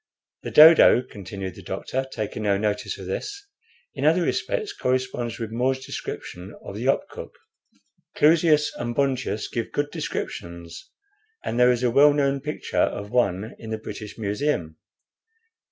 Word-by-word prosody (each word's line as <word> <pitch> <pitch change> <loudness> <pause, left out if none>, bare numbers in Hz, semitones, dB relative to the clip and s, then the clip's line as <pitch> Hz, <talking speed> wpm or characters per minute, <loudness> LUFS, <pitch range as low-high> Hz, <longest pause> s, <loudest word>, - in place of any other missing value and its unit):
"The - - -5
dodo," 155 -5 +8
continued 95 -5 -7
the - - -12
doctor, 130 +1 -4
taking 110 -2 -4
no 100 -2 +2
notice 105 0 -2
of - - -9
this, 405 -1 -5 0.5
"in - - -5
other - - +4
respects 425 -3 -1
corresponds 125 - -2
with 115 -2 -5
More's 130 +3 -1
description 90 +3 -7
of - - -8
the 115 +4 -4
opkuk. 135 - -1 0.9
Clusius 155 -1 +4
and 120 0 -4
Bontius 130 -6 -1
give 115 - -4
good 145 0 -2
descriptions 85 -1 -6 0.5
and 120 - -2
there 125 0 +6
is 125 0 -1
a 120 - +2
well 145 +4 +6
known 140 -1 +1
picture 150 +2 -5
of 100 +1 -1
one 110 -4 0
in 110 - -9
the 110 - -2
British 105 -1 -8
Museum. 105 - -2
120 Hz, 150 wpm, -24 LUFS, 105-140 Hz, 0.9 s, dodo